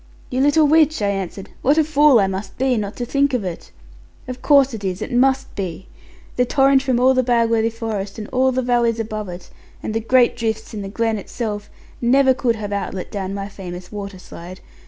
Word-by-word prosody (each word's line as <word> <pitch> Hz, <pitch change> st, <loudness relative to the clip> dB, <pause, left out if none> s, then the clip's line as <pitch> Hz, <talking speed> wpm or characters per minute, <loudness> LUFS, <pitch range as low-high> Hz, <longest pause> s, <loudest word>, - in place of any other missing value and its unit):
'You 255 Hz, +1 st, 0 dB
little 290 Hz, +2 st, +4 dB
witch,' 310 Hz, +1 st, +4 dB
I 200 Hz, -, +2 dB
answered; 195 Hz, -1 st, -5 dB
'what 285 Hz, +4 st, +3 dB
a 315 Hz, -, +5 dB
fool 295 Hz, -4 st, +5 dB
I 195 Hz, -, +3 dB
must 190 Hz, +1 st, -5 dB
be 260 Hz, 0 st, +1 dB
not 205 Hz, -2 st, -3 dB
to 245 Hz, -, -4 dB
think 280 Hz, +1 st, +1 dB
of 235 Hz, -, -1 dB
it! 180 Hz, -3 st, -6 dB, 0.6 s
Of 255 Hz, 0 st, -7 dB
course 275 Hz, -3 st, +4 dB
it 215 Hz, -2 st, -6 dB
is: 185 Hz, -1 st, -2 dB
it -, -, -5 dB
must 265 Hz, +2 st, +2 dB
be. 185 Hz, -1 st, -5 dB, 0.5 s
The 250 Hz, -, +4 dB
torrent 270 Hz, +1 st, +3 dB
from 260 Hz, -3 st, 0 dB
all 260 Hz, +1 st, +5 dB
the 255 Hz, -, +3 dB
Bagworthy 230 Hz, -2 st, +2 dB
forest, 215 Hz, -3 st, -5 dB
and 215 Hz, -1 st, -6 dB
all 260 Hz, +1 st, +2 dB
the 260 Hz, 0 st, -1 dB
valleys 240 Hz, -2 st, +1 dB
above 215 Hz, -2 st, -4 dB
it, 175 Hz, 0 st, -10 dB, 0.3 s
and 215 Hz, -, -3 dB
the 225 Hz, -, 0 dB
great 245 Hz, +2 st, +3 dB
drifts 220 Hz, -2 st, -3 dB
in 210 Hz, -, -5 dB
the 195 Hz, -, -6 dB
glen 225 Hz, +1 st, -1 dB
itself, 210 Hz, -1 st, -5 dB, 0.3 s
never 260 Hz, +2 st, +4 dB
could 245 Hz, -3 st, 0 dB
have 205 Hz, -2 st, -5 dB
outlet 190 Hz, -2 st, -4 dB
down 195 Hz, -1 st, -4 dB
my 200 Hz, 0 st, -4 dB
famous 180 Hz, -3 st, -9 dB
waterslide. 185 Hz, -3 st, -9 dB
230 Hz, 210 wpm, -20 LUFS, 200-260 Hz, 0.6 s, a